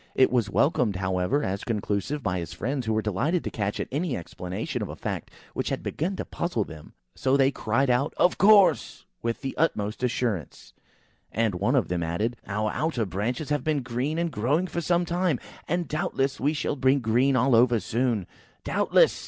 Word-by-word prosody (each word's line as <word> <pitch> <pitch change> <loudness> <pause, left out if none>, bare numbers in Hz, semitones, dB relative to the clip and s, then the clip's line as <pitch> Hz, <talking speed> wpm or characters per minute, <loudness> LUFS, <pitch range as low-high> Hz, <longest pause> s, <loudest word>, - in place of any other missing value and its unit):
It 130 - +5
was 120 -5 +1
welcomed, 125 - +2
however, 95 +9 0
as 95 +1 -2
conclusive 115 +5 -2
by 90 -3 0
his 85 -3 -6
friends, 130 +2 -3
who 110 - +2
were 110 0 0
delighted 130 - 0
to - - -4
catch 100 -2 -2
at - - -2
any 150 +1 -1
explanation 90 +2 -5
of - - -3
a - - -6
fact - - -4 0.2
which - - -2
had - - -3
begun 180 +6 -2
to - - -4
puzzle 170 -11 -1
them. 80 -5 -12 0.2
So 135 +1 +2
they 135 0 +4
cried 125 +2 +1
out, 130 +5 +1
"Of 180 - +3
course!" 200 -1 +5 0.2
with 115 0 -2
the 135 -1 -4
utmost 110 -9 0
assurance, 120 - -2 0.6
and 110 -1 +1
one 95 +3 +1
of - - +2
them 90 -1 -1
added, 100 +9 -1
"Our 105 +1 -1
outer 155 -8 -1
branches 115 +10 -3
have 145 0 0
been 150 -4 0
green 130 +6 -2
and 170 -1 0
growing 145 +11 +1
for 175 -1 -3
some 175 +2 +1
time, 175 -5 0 0.3
and 175 0 -1
doubtless 140 -4 -1
we 145 +3 +1
shall 150 -1 -1
be 130 0 +3
green 130 +2 +2
all 125 +1 +3
over 120 0 +5
soon!" 115 -3 0 0.4
"Doubtless!" - - +3
125 Hz, 195 wpm, -26 LUFS, 105-150 Hz, 0.6 s, It